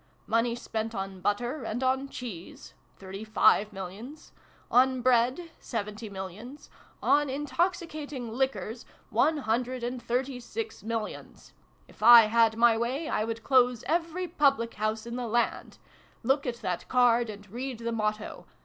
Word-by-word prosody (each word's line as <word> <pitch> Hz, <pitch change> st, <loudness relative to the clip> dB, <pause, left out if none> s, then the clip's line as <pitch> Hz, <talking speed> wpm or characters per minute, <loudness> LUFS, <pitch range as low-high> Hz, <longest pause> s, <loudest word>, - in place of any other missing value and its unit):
Money 230 Hz, +1 st, +1 dB
spent 225 Hz, -2 st, -4 dB
on 195 Hz, -1 st, -5 dB
butter 240 Hz, +8 st, -1 dB
and 230 Hz, +3 st, -3 dB
on 265 Hz, +1 st, +1 dB
cheese, 210 Hz, -11 st, -8 dB, 0.2 s
thirty 195 Hz, +2 st, -8 dB
five 215 Hz, -1 st, +3 dB
millions: 205 Hz, -, -9 dB, 0.4 s
on 255 Hz, +1 st, +4 dB
bread, 255 Hz, +7 st, +2 dB
seventy 210 Hz, -1 st, -5 dB
millions: 200 Hz, +8 st, -9 dB, 0.3 s
on 290 Hz, 0 st, +3 dB
intoxicating 295 Hz, -, -2 dB
liquors, 235 Hz, -3 st, -2 dB, 0.3 s
one 315 Hz, 0 st, +3 dB
hundred 250 Hz, 0 st, -1 dB
and 245 Hz, +1 st, -3 dB
thirty 250 Hz, +2 st, -2 dB
six 440 Hz, -, -6 dB
millions! 225 Hz, -1 st, -6 dB, 0.3 s
If -, -, -19 dB
I 235 Hz, +1 st, +10 dB
had 225 Hz, 0 st, +3 dB
my 235 Hz, -1 st, +5 dB
way, 255 Hz, +8 st, -2 dB
I -, -, 0 dB
would 225 Hz, 0 st, -4 dB
close 250 Hz, -2 st, +3 dB
every 335 Hz, +3 st, -1 dB
public 275 Hz, -8 st, +2 dB
house 215 Hz, +1 st, -2 dB
in 235 Hz, +1 st, -5 dB
the 245 Hz, -1 st, -3 dB
land! 235 Hz, +2 st, -1 dB, 0.5 s
Look 270 Hz, +3 st, +1 dB
at 235 Hz, -1 st, -4 dB
that 180 Hz, -2 st, -3 dB
card, 240 Hz, -2 st, +3 dB
and 205 Hz, -1 st, -9 dB
read 250 Hz, +2 st, -4 dB
the 235 Hz, 0 st, -3 dB
motto. 215 Hz, -1 st, -3 dB
235 Hz, 145 wpm, -28 LUFS, 220-265 Hz, 0.5 s, I